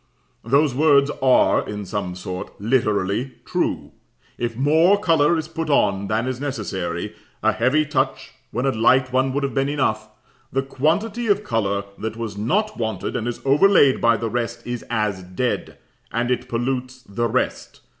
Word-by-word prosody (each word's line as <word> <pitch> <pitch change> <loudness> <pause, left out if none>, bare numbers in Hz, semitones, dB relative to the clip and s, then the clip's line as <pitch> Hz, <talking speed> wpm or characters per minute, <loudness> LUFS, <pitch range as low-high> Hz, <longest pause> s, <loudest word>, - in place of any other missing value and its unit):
Those 140 +4 +3
words 145 0 +4
are, 130 -1 +4
in 105 -1 -5
some 95 -3 -4
sort, 90 0 -7
literally 110 +1 0
true. - - -2 0.4
If 120 -1 -3
more 160 +9 +4
colour 165 -3 +3
is 160 -1 -3
put 165 -1 -4
on 100 -8 +2
than 110 +3 0
is 130 0 -3
necessary, 95 -11 -3 0.3
a - - +4
heavy 135 +6 +2
touch 135 -2 -1 0.2
when 125 +3 -2
a 135 - +3
light 130 +3 +3
one 130 +1 +2
would 140 +2 -1
have 140 - -2
been 135 0 +1
enough, 110 -7 -1 0.4
the 135 0 0
quantity 200 - -1
of 205 0 +2
colour 100 - -1 0.2
that 110 +1 -4
was 115 -3 -5
not 205 - -1
wanted, 110 -5 -3
and 120 -1 -2
is 120 - -4
overlaid 145 -1 +5
by 115 0 +4
the 115 +2 -3
rest, 120 -1 -3
is 120 -1 -4
as 105 -4 -1
dead, 95 +8 -3 0.3
and 120 +1 -1
it 125 - -2
pollutes 125 +1 -3
the 120 +1 -2
rest. 130 +3 -2
125 Hz, 165 wpm, -22 LUFS, 110-140 Hz, 0.4 s, overlaid